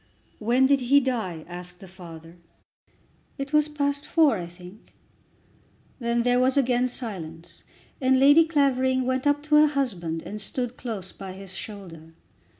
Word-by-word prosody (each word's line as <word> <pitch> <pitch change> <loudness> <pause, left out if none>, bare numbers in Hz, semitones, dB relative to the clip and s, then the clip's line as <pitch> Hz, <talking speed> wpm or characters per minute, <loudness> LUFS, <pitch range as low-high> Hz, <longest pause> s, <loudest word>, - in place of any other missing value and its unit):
"When 240 +4 +3
did 275 +1 +4
he 265 +3 +4
die?" 220 - -3
asked 180 0 -9
the 195 - -12
father. 170 -2 -12 1.0
"It 275 +1 -6
was 300 0 +4
past 285 -1 -2
four 315 -7 +4
I 170 - -5
think." 180 +4 -15 1.0
Then 235 -1 0
there 245 0 +3
was 260 +2 +2
again 250 -2 +2
silence, 170 -9 -7 0.4
and 260 0 +3
Lady 290 +4 +6
Clavering 260 -4 +1
went 260 +2 0
up 290 0 +1
to 300 0 +3
her 305 0 +7
husband 190 - -2
and 210 +1 -7
stood 245 +3 -4
close 215 -8 -6
by 190 -2 -9
his 190 -1 -10
shoulder. 175 -5 -9
240 Hz, 150 wpm, -25 LUFS, 180-275 Hz, 1.0 s, her